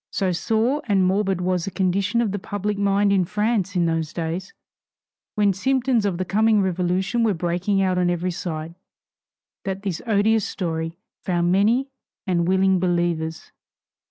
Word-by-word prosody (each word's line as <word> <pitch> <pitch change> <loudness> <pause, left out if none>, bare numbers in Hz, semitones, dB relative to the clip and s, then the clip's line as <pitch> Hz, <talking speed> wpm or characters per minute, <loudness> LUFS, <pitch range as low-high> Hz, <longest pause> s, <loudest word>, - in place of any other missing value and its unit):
So 190 -2 0
sore 225 - 0
and 195 -3 +3
morbid 190 -1 +1
was 180 -1 0
the - - -3
condition 195 +4 0
of 220 -4 0
the 205 - -3
public 205 +2 -3
mind 200 0 +2
in 190 -2 +3
France 210 0 -1
in 175 -1 +2
those 165 -1 -1
days, 170 +3 -4 0.8
when 205 -2 +3
symptoms 250 +1 +1
of 185 -4 -2
the 185 - -2
coming 215 +3 +3
Revolution 190 +4 0
were 215 -4 +2
breaking 180 +4 0
out 185 -1 +1
on 180 -1 +2
every 175 +1 -1
side, 165 -2 -5 0.9
that 195 0 -4
this 190 -5 -3
odious 220 0 +3
story 165 -3 -3 0.2
found 175 -2 0
many 230 +8 +2 0.3
and 175 -3 +1
willing 190 0 +3
believers. 170 -3 -1
190 Hz, 155 wpm, -23 LUFS, 175-205 Hz, 0.9 s, and